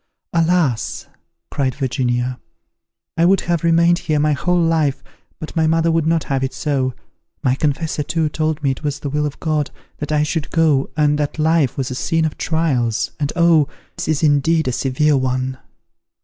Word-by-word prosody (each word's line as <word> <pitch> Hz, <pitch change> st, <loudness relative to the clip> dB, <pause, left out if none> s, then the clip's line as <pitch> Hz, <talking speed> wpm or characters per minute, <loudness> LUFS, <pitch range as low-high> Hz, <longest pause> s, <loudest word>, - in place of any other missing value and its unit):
"Alas!" 165 Hz, -7 st, +1 dB, 0.5 s
cried 130 Hz, -3 st, -1 dB
Virginia, 125 Hz, -2 st, -1 dB, 0.8 s
"I 165 Hz, -, +4 dB
would 190 Hz, +2 st, +4 dB
have 170 Hz, -1 st, -1 dB
remained 170 Hz, +1 st, +4 dB
here 155 Hz, -2 st, -1 dB
my 150 Hz, +1 st, +2 dB
whole 175 Hz, +5 st, +1 dB
life, 160 Hz, -4 st, +1 dB, 0.4 s
but 155 Hz, -, -8 dB
my 160 Hz, -1 st, +2 dB
mother 165 Hz, +1 st, +2 dB
would 165 Hz, -1 st, +1 dB
not 165 Hz, -1 st, +2 dB
have 135 Hz, -1 st, -1 dB
it 130 Hz, -, -3 dB
so. 135 Hz, -4 st, -1 dB, 0.5 s
My 130 Hz, -, +3 dB
confessor, 150 Hz, +3 st, -1 dB
too, 160 Hz, +2 st, 0 dB
told 155 Hz, 0 st, -2 dB
me 135 Hz, -, +2 dB
it 130 Hz, -, -5 dB
was 150 Hz, 0 st, -3 dB
the 140 Hz, -, -4 dB
will 150 Hz, +1 st, 0 dB
of 145 Hz, -, -8 dB
God 155 Hz, -2 st, -1 dB, 0.3 s
that 150 Hz, 0 st, -4 dB
I 150 Hz, 0 st, +2 dB
should 150 Hz, 0 st, -2 dB
go, 155 Hz, -4 st, +2 dB
and 150 Hz, -1 st, +2 dB
that 145 Hz, +1 st, -2 dB
life 160 Hz, -3 st, +2 dB
was 130 Hz, -2 st, -2 dB
a -, -, -2 dB
scene 160 Hz, +5 st, 0 dB
of 155 Hz, -, -2 dB
trials! 135 Hz, -9 st, 0 dB
and 145 Hz, -1 st, -1 dB
Oh! 165 Hz, -4 st, +4 dB, 0.3 s
this -, -, -5 dB
is 155 Hz, 0 st, 0 dB
indeed 155 Hz, +1 st, +3 dB
a -, -, +1 dB
severe 135 Hz, +4 st, +1 dB
one." 130 Hz, 0 st, -1 dB
150 Hz, 185 wpm, -19 LUFS, 135-165 Hz, 0.8 s, I